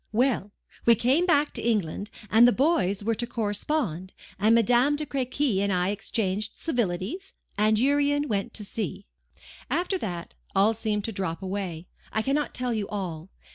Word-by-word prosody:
"Well! 220 -3 +1 0.4
we 235 - +8
came 270 - +2
back 295 -3 +3
to - - -4
England, 205 -3 -1 0.2
and 230 +3 +7
the - - +6
boys 210 - +1
were 230 +2 +1
to 240 +2 -3
correspond; 205 - -2 0.3
and 215 +3 +5
Madame 245 +5 +4
de 300 +1 -3
Crequy 260 -5 0
and 200 0 +1
I 180 0 +1
exchanged 205 0 -1
civilities; 240 - -2 0.2
and 215 +1 +3
Urian 285 +3 +2
went 200 -5 -1
to 210 - 0
sea." 205 -3 -4 0.6
"After 355 +7 0
that, 175 - -5 0.2
all 200 +3 +4
seemed 215 -2 -2
to 225 - -3
drop 190 -3 -3
away. 185 -4 -4 0.3
I 220 - 0
cannot 285 +3 -1
tell 250 -1 -1
you 210 -3 -2
all. 180 -5 -5
220 Hz, 165 wpm, -26 LUFS, 195-265 Hz, 0.6 s, we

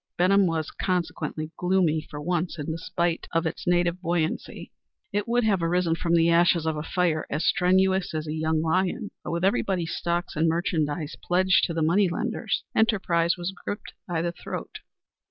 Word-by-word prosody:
Benham 195 +2 +4
was 160 -2 -2
consequently 170 -3 -2
gloomy 180 -4 +2
for 150 -1 -9
once 175 +2 -1
in 150 +1 -4
despite 170 +1 -2
of 165 0 +1
its 160 - -4
native 175 0 +2
buoyancy. 170 -2 -2 0.4
It 205 +2 -1
would 240 +1 +2
have 200 -5 +2
arisen 170 0 +1
from 170 +1 +1
the 165 0 +4
ashes 170 -1 +4
of 160 -1 0
a 150 - -3
fire 160 -1 0
as 155 +3 -1
strenuous 190 -1 +2
as 155 0 -2
a 155 - -4
young 160 0 0
lion. 185 +5 0
But, - - -5
with 170 +2 0
everybody's 185 -3 0
stocks 175 +1 -2
and 160 +2 +2
merchandise 160 -2 -1
pledged 185 +1 +3
to 170 - -4
the 165 - +1
money 180 +4 +3
lenders, 220 +3 -2
enterprise 185 -6 +2
was 175 +2 -3
gripped 205 - -5
by 165 -2 -1
the 170 - -1
throat. - - -7
170 Hz, 175 wpm, -26 LUFS, 160-185 Hz, 0.4 s, Benham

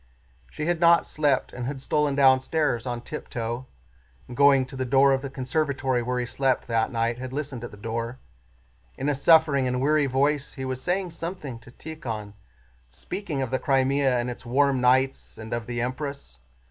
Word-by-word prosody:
She 150 - -5
had 175 0 0
not 170 0 +5
slept 145 -4 0
and 125 -1 -4
had 135 0 -4
stolen 145 +1 0
downstairs 130 -1 +3
on 120 -1 -3
tiptoe, 120 +1 -5 0.6
and 125 - -8
going 140 -1 +5
to 130 - -11
the 130 - -2
door 135 +2 +4
of 135 - 0
the 140 - -5
conservatory 135 -1 -1
where 125 +1 -1
he 125 - -1
slept 130 +1 0
that 115 -1 +1
night 115 0 -1
had 130 0 -6
listened 135 -3 -4
at 120 - -5
the 105 - -13
door. 115 +3 -4 0.8
In 135 +3 -1
a 145 - +1
suffering 145 -2 +4
and 125 0 -1
weary 145 +1 +3
voice 140 +2 0
he 135 -2 -5
was 130 0 -3
saying 180 +2 -1
something 165 -7 -6
to 120 - -16
Tíkhon, 120 -9 -7 0.6
speaking 145 - -4
of 130 - -5
the 130 - 0
Crimea 135 0 +2
and 120 0 -1
its 120 - -9
warm 135 +1 +2
nights 130 +2 +2
and 110 0 -7
of 120 -1 -3
the 120 0 -2
Empress. 130 - -5
130 Hz, 185 wpm, -25 LUFS, 120-145 Hz, 0.8 s, not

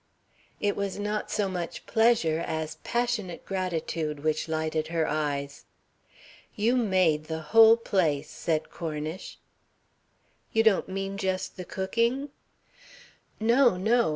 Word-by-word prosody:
It 205 -1 0
was 200 -1 -3
not 210 +1 -2
so 205 -2 0
much 180 -3 -5
pleasure 220 -9 +3
as 160 -1 -4
passionate 235 -7 -2
gratitude 165 -5 -2
which 155 0 0
lighted 160 0 -1
her 165 -1 0
eyes. 145 -2 -2 0.9
"You 225 +4 +2
made 185 -10 +2
the 160 0 -4
whole 225 0 +8
place," 155 -10 0
said 160 -2 -2
Cornish. 155 +1 -5 1.2
"You 225 - +4
don't 220 -4 +3
mean 195 +1 -3
just 190 -1 -2
the 180 - -7
cooking?" 235 +10 -1 1.1
"No, 235 -1 +4
no. 230 +4 +2
185 Hz, 120 wpm, -27 LUFS, 160-220 Hz, 1.2 s, whole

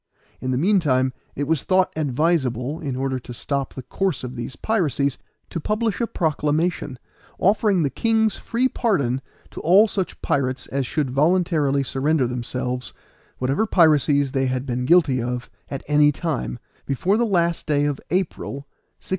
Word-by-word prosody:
In 130 - -4
the 130 - +1
meantime 140 -7 +2 0.2
it 145 - -2
was 155 0 +1
thought 185 -1 +2
advisable, 145 -2 0
in 140 -5 -3
order 130 0 -1
to 125 0 -10
stop 140 +2 -3
the 130 - -6
course 190 -4 -2
of 125 0 -6
these 120 +1 -5
piracies, 145 - 0 0.3
to 170 - -3
publish 215 +5 -1
a 235 - +1
proclamation, 155 - -1 0.4
offering 200 -2 +3
the 140 - 0
king's 220 - +1
free 240 +3 0
pardon 140 - 0 0.3
to - - -8
all 190 +7 +5
such 195 -3 -3
pirates 135 -5 0
as 135 -2 -2
should 145 -5 -1
voluntarily 150 -2 +2
surrender 135 +2 +1
themselves, 125 +1 -3 0.4
whatever 135 +12 0
piracies 145 -6 +4
they 135 0 +1
had 130 0 -2
been 125 -1 -2
guilty 145 -5 +4
of 125 +1 -4 0.2
at 135 - -5
any 150 0 +5
time, 135 - -3 0.3
before 175 +9 +1
the 235 - +2
last 170 -4 +1
day 145 -1 +2
of 145 -2 -2
April, 185 -5 -1
1699. 140 - -6
145 Hz, 160 wpm, -22 LUFS, 130-175 Hz, 0.4 s, all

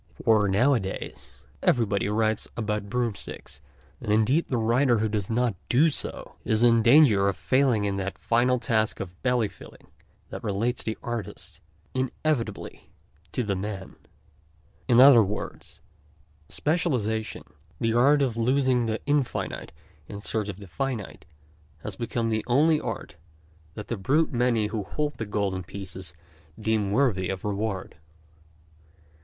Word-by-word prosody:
For, 110 -2 +4
nowadays, 100 - -1 0.2
everybody 100 -5 +1
writes 110 0 0
about 105 -2 -2
broom 120 0 0
sticks, - - -10 0.4
and 105 - -2
indeed 115 +10 +3
the 125 - -1
writer 120 +2 +3
who 110 +1 +1
does 105 -3 -3
not 115 -2 +1
do 155 +6 +4
so - - -5
is 110 +1 +1
in 115 -1 +5
danger 115 -6 +6
of 100 - -3
failing 130 -6 +2
in 100 -1 -1
that 95 0 -4
final 125 +2 +2
task 110 -2 0
of 90 -2 -7
belly 125 -3 +2
filling - - -15 0.4
that - - -7
relates 110 +4 -1
the 110 - -3
artist 120 -3 -6 0.3
inevitably 130 -4 -2 0.4
to 125 - -1
the 100 -3 -1
man. 95 0 -5 0.9
In 120 -1 +5
other 130 -3 +9
words, 105 0 -5 0.7
specialization, 125 -10 -1 0.4
the 115 0 +1
art 140 +5 +4
of 125 -4 -1
losing 125 0 +2
the 110 0 -1
infinite 145 -3 -1 0.4
in 100 - -7
search 105 0 -2
of 100 -1 -6
the 100 - -10
finite, 115 - -4 0.6
has - - -5
become 115 -1 -2
the 110 -1 0
only, 150 +5 +3
art - - -6 0.6
that 105 - -7
the 120 - -3
brute 145 +10 +1
many 120 -3 +2
who 105 0 -2
hold 145 +9 -3
the 110 - -3
golden 100 -2 -1
pieces 95 -2 -7 0.4
deem 110 -2 0
worthy 100 -5 +1
of 95 0 -4
reward. 105 -1 -3
110 Hz, 140 wpm, -26 LUFS, 105-125 Hz, 0.9 s, other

